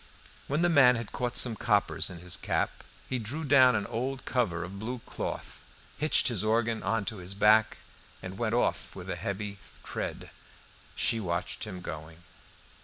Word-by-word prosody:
When 150 +5 +1
the - - +5
man 140 -7 +6
had 115 -2 -5
caught 125 -2 -2
some 120 -3 +1
coppers 105 -4 +2
in 90 - -7
his 90 -1 -3
cap, - - -1 0.2
he 130 - -1
drew 130 +9 -3
down 130 -4 +6
an 105 -2 0
old 130 +3 -3
cover 90 -10 0
of 95 +3 -7
blue 120 +4 -3
cloth, - - -5 0.4
hitched 155 +2 +3
his 115 -6 0
organ 115 +1 +1
on 105 +1 0
to 110 0 -4
his 95 +1 -6
back, 105 +1 +5 0.4
and 95 +1 -8
went 115 -1 +1
off 120 - 0
with - - -6
a - - -2
heavy 100 0 -4 0.2
tread. - - -5 0.6
She 115 - +2
watched 85 +1 -3
him 95 -4 -7
going. 80 +1 -8
110 Hz, 175 wpm, -29 LUFS, 100-125 Hz, 0.6 s, man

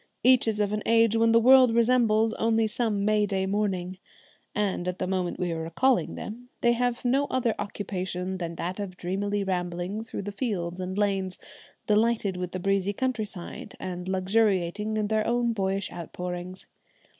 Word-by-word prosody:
Each 255 -2 +5
is 215 -1 0
of 205 0 +1
an 210 - -1
age 230 -1 +4
when 225 0 +4
the 230 - +6
world 255 0 +6
resembles 225 -2 +3
only 225 0 +2
some 210 -2 0
May 210 -1 +3
day 190 -1 0
morning, 190 -2 -1 0.6
and 195 -3 -1
at 180 0 -2
the - - -2
moment 185 -1 -2
we 180 -1 -1
are 165 -1 -3
recalling 200 +11 +1
them 245 +3 -8
they 240 - +4
have 245 +1 -1
no 270 +3 +3
other 245 -5 0
occupation 190 -2 -4
than 170 -1 -4
that 180 +4 -4
of 190 -3 -5
dreamily 200 +3 -1
rambling 180 +2 -2
through 225 - -6
the 205 - -4
fields 190 -6 -3
and 185 +1 -4
lanes, 195 -3 0 0.5
delighted 215 -2 +2
with 180 -1 -4
the 185 - -4
breezy 195 +1 +1
country 250 -1 -1
side, 185 -4 -8
and 180 0 -5
luxuriating 195 +1 +1
in 215 - +1
their 215 0 0
own 235 0 +1
boyish 195 -1 -1
outpourings. 180 +2 -6
205 Hz, 175 wpm, -27 LUFS, 185-225 Hz, 0.6 s, the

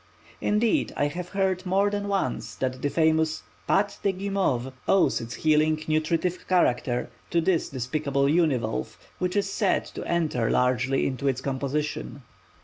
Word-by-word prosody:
Indeed 210 +2 +2
I 145 - +2
have 175 +4 -4
heard 190 -2 0
more 195 +2 +2
than 205 0 -2
once 200 -1 -2
that 130 -1 -3
the 145 - 0
famous 160 0 +2 0.3
"Pâte 200 +1 +1
de 200 - +2
Guimauve" 185 -10 -1
owes 195 - +3
its 115 +1 -6
healing 155 0 +2
nutritive 160 +3 0
character 125 -9 +1 0.2
to 170 - +2
this 170 0 +1
despised 135 +3 -3
univalve, 140 - +1 0.2
which 180 +1 -1
is 200 -1 +1
said 200 0 +1
to - - -5
enter 155 -9 0
largely 130 +1 +2
into 140 +1 -2
its 130 -2 +1
composition. 140 +1 -3
155 Hz, 145 wpm, -26 LUFS, 135-185 Hz, 0.3 s, owes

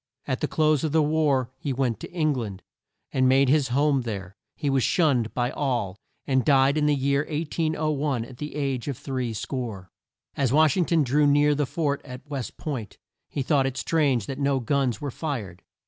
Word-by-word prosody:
At - - -2
the - - +1
close 155 -2 +2
of 155 -2 -1
the 160 -1 +4
war, 145 -5 +1
he 145 - -3
went 130 -3 0
to - - -8
Eng 155 -4 +1
land, 105 -7 -5 0.5
and 130 -1 +3
made 135 0 +4
his 145 -1 +3
home 140 +2 +2
there. 100 -5 -6 0.2
He 150 - -3
was 135 -1 +2
shunned 130 -8 +2
by 120 0 0
all, 120 -11 -1 0.3
and 130 -2 +2
died 135 0 +4
in 150 -1 +2
the 150 - +3
year 140 +1 +1
1801, 155 -4 -1
at 125 0 -12
the 150 0 -6
age 135 -4 -2
of 140 -4 -3
three 130 -4 -3
score. 110 -5 -5 0.4
As 135 -4 +1
Wash 155 0 +4
ing 180 - +2
ton 165 -2 +2
drew 145 +3 +3
near 145 +1 +4
the 145 -1 0
fort 145 -3 -1
at 130 +2 -10
West 140 -4 -5
Point, 130 -9 -5 0.3
he 140 - -2
thought 135 -1 +2
it 135 0 -4
strange 140 -9 +1
that 135 +4 -5
no 140 -1 +1
guns 125 -2 0
were 145 -2 -3
fired. 115 - -5
140 Hz, 200 wpm, -25 LUFS, 125-150 Hz, 0.5 s, the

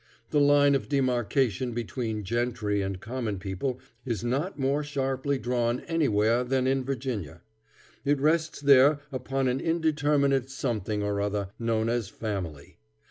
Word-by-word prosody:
The 150 - +3
line 145 0 +5
of 135 - -1
demarkation 125 -3 +1
between 115 -2 -3
gentry 110 -1 -1
and 95 -1 -3
common 110 -1 -3
people 100 +7 -3 0.2
is 120 -4 -3
not 140 +10 -1
more 140 +2 +1
sharply 135 -1 -1
drawn 120 0 0
anywhere 120 -7 +2
than 130 +1 0
in 135 0 +1
Virginia. 125 - -4 0.6
It 145 0 +2
rests 155 +1 +1
there 140 +1 +6
upon 135 +1 -1
an 125 +1 0
indeterminate 145 -5 +1
something 110 -6 -2
or 100 0 -1
other, 100 -1 -1
known 115 -1 0
as 115 -3 -1
family. 90 -10 -5
125 Hz, 135 wpm, -27 LUFS, 110-140 Hz, 0.6 s, there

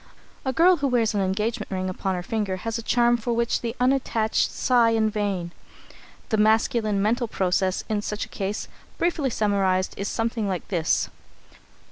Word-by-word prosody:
A 265 - 0
girl 350 +6 +5
who 285 -2 0
wears 235 -4 +2
an 205 - +1
engagement 210 +4 -1
ring 185 -1 -2
upon 185 +1 -2
her 180 - -4
finger 205 -1 -2
has 225 +5 -4
a - - -4
charm 240 +1 +3
for 235 +1 -2
which 235 0 0
the 235 0 -3
unattached 250 -4 +1
sigh 240 -3 +3
in 220 -1 +2
vain. 200 -5 -2 0.8
The 220 - +1
masculine 215 -1 +2
mental 235 +3 +1
process 185 -2 0
in 215 -2 -1
such 210 +1 -3
a - - -21
case, 200 +1 -4 0.3
briefly 330 -5 0
summarised, 195 -4 +1
is 200 - -3
something 225 -1 -1
like 185 -3 -3
this. 170 -4 0
220 Hz, 170 wpm, -24 LUFS, 195-235 Hz, 0.8 s, girl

